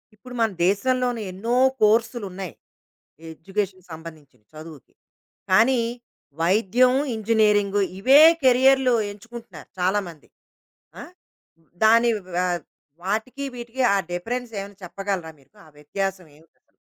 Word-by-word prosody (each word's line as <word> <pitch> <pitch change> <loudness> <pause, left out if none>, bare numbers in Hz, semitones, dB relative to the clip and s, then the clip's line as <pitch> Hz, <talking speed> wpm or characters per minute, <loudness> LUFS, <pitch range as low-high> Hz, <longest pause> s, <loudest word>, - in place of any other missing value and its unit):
ఇప్పుడు 250 +4 -13
మన 225 - +3 0.2
దేశంలోనే 245 +4 0
ఎన్నో 225 +6 -2 0.3
కోర్సులున్నాయి, 210 -4 0 0.8
ఎడ్యుకేషన్‌కి 185 +2 -5
సంబంధించినియి 155 -8 -13
చదువుకి. 155 -3 -12 0.6
కానీ 235 +6 +4 0.6
వైద్యం, 220 +8 +3 0.2
ఇంజినీరింగు, 210 -2 +2 0.2
ఇవే 270 +8 +6 0.2
కేరియర్లు 260 0 +4 0.2
ఎంచుకుంటున్నారు 225 -5 -12
చాలామంది. 180 -4 -2 0.7
ఆ! - - -7 0.8
దాని 230 +2 +5 0.3
వ - - +1 0.7
వాటికీ 220 +8 -3
వీటికి 240 +1 -5
ఆ - - +3 0.2
డిఫరెన్సేవన్నా 205 +1 -5
చెప్పగలరా 190 -2 -4
మీరు? 135 - -26
ఆ 155 - -18
వ్యత్యాసవేమిటసలు? 165 0 -7
205 Hz, 90 wpm, -23 LUFS, 180-235 Hz, 0.8 s, ఇవే